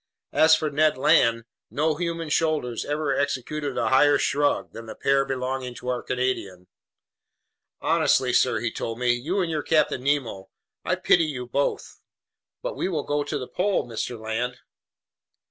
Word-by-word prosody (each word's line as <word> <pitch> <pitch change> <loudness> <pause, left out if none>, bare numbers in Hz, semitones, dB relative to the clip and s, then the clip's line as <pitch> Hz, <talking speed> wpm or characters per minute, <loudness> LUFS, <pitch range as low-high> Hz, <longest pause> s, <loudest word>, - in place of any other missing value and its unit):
As 160 0 +6
for 155 -2 -2
Ned 155 0 +2
Land, 115 -3 +3 0.2
no 155 +2 +1
human 165 0 -3
shoulders 150 -7 0
ever 150 -1 -1
executed 140 +1 -2
a - - +1
higher 145 +2 +5
shrug 145 0 0
than 115 0 -9
the - - -8
pair 135 0 +2
belonging 130 -1 -3
to 125 - -6
our 125 -1 -1
Canadian. 125 -8 -3 1.2
"Honestly, 125 -1 +2
sir," 115 -4 +2
he 120 -1 -1
told 115 0 -4
me. 125 0 +2
"You 160 +12 -1
and 170 -2 -1
your 155 -1 -1
Captain 155 -5 +1
Nemo, 130 -9 -1 0.3
I - - 0
pity 170 -2 +3
you 130 -5 -4
both!" 140 +4 -2 0.6
"But - - -3
we - - -2
will 155 -6 -2
go 145 0 -1
to 145 - -3
the 125 - -6
pole, 190 -7 0
Mr. 115 0 -4
Land." 115 +3 -3
135 Hz, 165 wpm, -25 LUFS, 125-155 Hz, 1.2 s, As